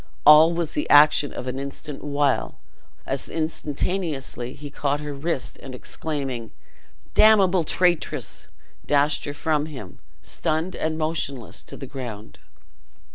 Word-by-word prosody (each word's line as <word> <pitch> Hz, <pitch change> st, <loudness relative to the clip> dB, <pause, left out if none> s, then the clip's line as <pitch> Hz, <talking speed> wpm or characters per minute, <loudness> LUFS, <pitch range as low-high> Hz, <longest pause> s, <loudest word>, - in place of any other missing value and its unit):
All 150 Hz, +2 st, +9 dB
was 170 Hz, -2 st, -2 dB
the 150 Hz, -, -2 dB
action 150 Hz, 0 st, +6 dB
of -, -, -6 dB
an 130 Hz, +1 st, -3 dB
instant 140 Hz, +1 st, -7 dB
while, 145 Hz, -1 st, 0 dB, 0.5 s
as -, -, -3 dB
instantaneously, 155 Hz, -4 st, -2 dB
he 145 Hz, 0 st, -9 dB
caught 145 Hz, 0 st, -1 dB
her 150 Hz, -1 st, -5 dB
wrist, 140 Hz, 0 st, -3 dB
and 130 Hz, -2 st, -8 dB
exclaiming, 135 Hz, -5 st, -4 dB, 0.6 s
"Damnable 195 Hz, -, +5 dB
traitress!" 175 Hz, +1 st, 0 dB, 0.4 s
dashed 145 Hz, +1 st, +2 dB
her 145 Hz, -, -4 dB
from 150 Hz, 0 st, 0 dB
him, 130 Hz, -, -9 dB, 0.2 s
stunned 160 Hz, +4 st, -2 dB
and 160 Hz, 0 st, -2 dB
motionless 155 Hz, -6 st, -3 dB
to -, -, -10 dB
the 135 Hz, -, -7 dB
ground. 120 Hz, -6 st, -8 dB
150 Hz, 130 wpm, -24 LUFS, 135-160 Hz, 0.6 s, All